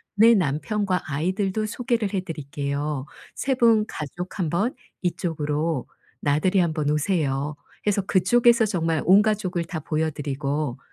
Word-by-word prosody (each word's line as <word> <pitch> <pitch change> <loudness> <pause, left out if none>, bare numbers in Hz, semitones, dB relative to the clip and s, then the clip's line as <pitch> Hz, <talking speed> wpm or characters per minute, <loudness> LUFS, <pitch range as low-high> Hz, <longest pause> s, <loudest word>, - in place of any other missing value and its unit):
"내 225 +3 +7
남편과 185 +4 0
아이들도 190 +6 0
소개를 230 -2 -1
해 195 - +1
드릴게요. 145 -3 -3 0.3
3 270 -1 0
분 230 -3 +4
가족 175 +5 -6
1 170 -4 0
번 205 +9 0 0.3
이쪽으로 160 -4 -1 0.3
나들이 155 +7 +2
한 170 -3 +2
번 155 -2 -1
오세요." 150 -3 0 0.3
해서 205 -1 +2
그쪽에서 235 +5 +4
정말 165 -5 0
온 195 +3 +7
가족을 195 -5 -1
다 165 -2 -5
보여 155 +2 -1
드리고 140 -1 -3
175 Hz, 275 characters per minute, -24 LUFS, 150-205 Hz, 0.3 s, 내